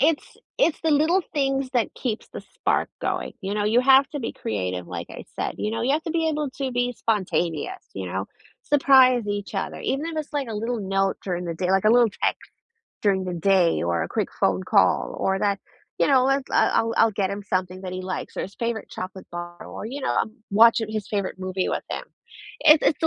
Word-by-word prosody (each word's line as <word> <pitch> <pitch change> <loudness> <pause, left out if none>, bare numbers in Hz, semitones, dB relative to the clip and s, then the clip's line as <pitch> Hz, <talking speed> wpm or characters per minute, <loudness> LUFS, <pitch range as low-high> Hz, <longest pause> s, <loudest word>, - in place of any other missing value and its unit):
It's 300 +2 +1 0.2
it's 340 -11 +2
the 320 -1 +2
little 325 +6 +3
things 270 -2 0
that 240 -4 +1
keeps 235 -4 -4
the - - -8
spark - - +1
going, - - -2
you 195 +1 -3
know? 205 -1 0
You 230 +4 +4
have 270 +1 +6
to 290 -2 -4
be 230 - -3
creative, 90 -4 -3
like - - -6
I - - -9
said, - - -2
you 210 - -1
know, 225 +1 -2
you 265 +3 +2
have 315 +2 +1
to 325 - -3
be 325 -1 +1
able 300 -2 -1
to 270 -2 -1
be 245 0 0
spontaneous, 180 -8 -1
you 95 -1 -4
know, 95 +2 -3 0.4
surprise 260 -5 +5
each 205 0 -4
other, 195 - -3
even 280 +4 -1
if 330 -1 -5
it's, 305 -1 -4
like, 280 -4 -2
a 220 - -4
little 230 +2 -2
note 195 0 0
during 180 -2 -3
the 170 -1 -3
day, 180 +2 -1
like, 195 +1 +3
a 215 - +6
little 240 -2 +5
text - - -1 0.5
during 190 -2 +2
the 180 - -3
day, 175 - +3
or 85 0 0
a - - -3
quick - - -1
phone 95 -1 +2
call, - - +2
or 190 0 +1
that 200 -1 +1 0.4
You - - +3
know, 260 -2 +5
let's 270 0 +1
I'll - - +3
I'll 230 0 0
I'll 225 - +5
get 195 -1 0
him 200 +1 -4
something 185 -1 -2
that 185 - -5
he 185 0 -4
likes, 185 0 -5
or - - -1
his 195 - -8
favorite 230 -2 -3
chocolate 185 +1 -7
bar 175 0 -7
or, - - -7
you 270 +5 -5
know, - - 0
I'm 220 - -7 0.2
watching 220 +1 +5
his 215 -2 -3
favorite 200 -3 -2
movie 185 0 -2
with - - -2
him. - - -4 0.6
It's 305 0 +7
it's - - -2
the 320 - +3
215 Hz, 230 wpm, -24 LUFS, 185-265 Hz, 0.6 s, It's